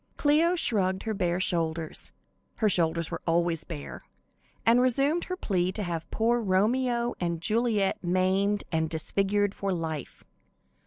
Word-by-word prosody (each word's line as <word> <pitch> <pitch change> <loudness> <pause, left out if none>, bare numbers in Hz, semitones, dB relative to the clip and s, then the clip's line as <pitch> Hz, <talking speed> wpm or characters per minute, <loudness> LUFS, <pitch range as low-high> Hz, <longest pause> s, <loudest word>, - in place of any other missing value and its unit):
Cleo 315 +4 +3
shrugged 190 - 0
her 220 - -2
bare 180 -3 0
shoulders 165 -4 -1 0.4
her 220 - +1
shoulders 170 -3 +1
were 165 - -4
always 170 -1 +1
bare 150 -5 -8 0.6
and 235 +2 +5
resumed 275 +7 +2
her 365 - -4
plea 185 - 0
to 210 - -3
have 170 -3 -4
poor 235 +2 +1
Romeo 235 +5 +1
and 170 -2 -1
Juliet 215 0 0
maimed 190 +3 +1
and 160 -1 0
disfigured 200 +5 0
for 200 -1 -3
life. 160 -5 -4
190 Hz, 140 wpm, -28 LUFS, 170-230 Hz, 0.6 s, and